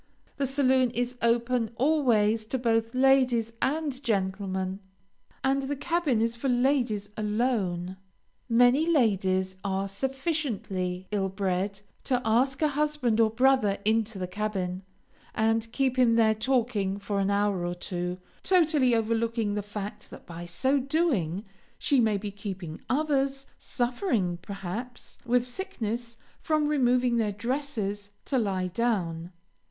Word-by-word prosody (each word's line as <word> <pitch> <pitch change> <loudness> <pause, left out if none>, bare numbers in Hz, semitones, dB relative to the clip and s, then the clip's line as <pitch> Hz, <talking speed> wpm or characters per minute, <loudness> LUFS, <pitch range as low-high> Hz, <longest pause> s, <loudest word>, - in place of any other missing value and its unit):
The 275 -1 0
saloon 260 -2 +3
is 245 +1 -2
open 235 0 +1
always 235 -6 +2
to 255 +4 -2
both 230 -1 0
ladies 255 -4 +3
and 285 -2 -1
gentlemen, 190 -3 -1 0.6
and 270 +1 +2
the 275 +2 -2
cabin 290 -6 +1
is 230 0 0
for 265 +3 -2
ladies 245 -5 +1
alone. 210 -5 -1 0.5
Many 245 +6 +4
ladies 190 - +2
are 195 0 -1
sufficiently 200 - -2
ill 195 -2 0
bred 195 +1 -2 0.2
to 255 -2 +1
ask 260 +6 +2
a 305 - +4
husband 290 -6 0
or 225 -1 +5
brother 250 -3 +3
into 220 -1 +1
the 185 - -2
cabin, 190 -2 -3 0.5
and 225 +1 +1
keep 260 -1 0
him 235 -2 +5
there 220 -1 +4
talking 220 -4 0
for 200 0 -2
an 195 0 +1
hour 200 -2 +1
or 175 0 -2
two, 180 0 -4 0.2
totally 310 -9 +3
overlooking 225 -1 0
the 205 - -1
fact 205 0 -7
that - - -12
by 170 0 -8
so 265 +11 +1
doing 255 - 0 0.3
she 280 - +2
may 220 -3 +3
be 205 +1 -5
keeping 190 -5 -7
others, 275 -1 0
suffering, 240 - -1
perhaps, 200 +6 -7
with 245 0 +3
sickness, 235 - -5 0.2
from 305 -1 +1
removing 250 -4 +2
their 215 -2 +1
dresses 205 -3 -3 0.2
to 265 - +1
lie 190 -4 0
down. 180 -5 -1
230 Hz, 135 wpm, -27 LUFS, 200-260 Hz, 0.6 s, or